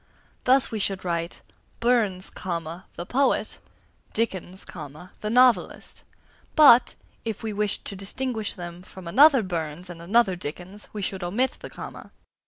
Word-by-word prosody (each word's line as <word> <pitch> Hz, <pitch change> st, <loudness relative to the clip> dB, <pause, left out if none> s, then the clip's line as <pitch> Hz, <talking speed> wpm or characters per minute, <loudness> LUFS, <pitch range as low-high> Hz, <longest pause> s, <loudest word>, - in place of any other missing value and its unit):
Thus 260 Hz, +1 st, +4 dB
we 220 Hz, -, -2 dB
should 195 Hz, -2 st, -2 dB
write 170 Hz, -1 st, -2 dB, 0.4 s
"Burns, 225 Hz, -6 st, +2 dB
the 170 Hz, 0 st, -5 dB
poet," 275 Hz, +2 st, +1 dB, 0.5 s
"Dickens, 190 Hz, -4 st, -3 dB
the 160 Hz, +6 st, -8 dB
novelist"; 250 Hz, +1 st, +3 dB, 0.5 s
but, 275 Hz, -6 st, +7 dB, 0.3 s
if 225 Hz, -1 st, -4 dB
we 220 Hz, -1 st, -3 dB
wished 210 Hz, 0 st, -1 dB
to 200 Hz, -, -4 dB
distinguish 220 Hz, +3 st, -3 dB
them 175 Hz, -1 st, -8 dB
from 185 Hz, -1 st, -12 dB
another 270 Hz, -, +6 dB
Burns 170 Hz, -1 st, -4 dB
and 170 Hz, -1 st, -10 dB
another 195 Hz, +2 st, +3 dB
Dickens, 180 Hz, +5 st, -6 dB
we 210 Hz, -2 st, -5 dB
should 190 Hz, -1 st, -3 dB
omit 225 Hz, +10 st, 0 dB
the -, -, -8 dB
comma. -, -, -9 dB
195 Hz, 135 wpm, -25 LUFS, 175-230 Hz, 0.5 s, but